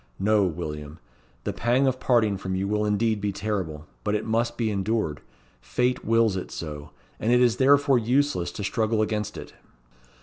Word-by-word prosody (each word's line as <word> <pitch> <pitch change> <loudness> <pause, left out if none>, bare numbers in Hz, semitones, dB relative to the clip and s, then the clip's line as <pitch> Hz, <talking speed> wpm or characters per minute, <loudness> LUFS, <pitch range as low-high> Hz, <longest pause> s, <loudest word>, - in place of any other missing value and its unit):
No, 105 0 +3
William. 75 -3 -5 0.5
The - - -2
pang 125 +4 +2
of 130 -1 +1
parting 115 -6 +2
from 95 0 -4
you 95 +1 -1
will 105 +1 0
indeed 105 +1 +1
be 105 - 0
terrible, 95 -7 -3 0.2
but 105 0 0
it 105 - -2
must 115 +1 0
be 115 -2 0
endured. 100 -7 -1 0.4
Fate 125 +1 0
wills 115 -2 +3
it 95 - -4
so, 75 -2 -7 0.3
and 115 - 0
it 125 - +5
is 120 -2 +3
therefore 140 -1 +4
useless 125 -4 +1
to 100 - -5
struggle 110 +1 +1
against 105 -1 -3
it." - - -9
110 Hz, 175 wpm, -25 LUFS, 95-120 Hz, 0.5 s, it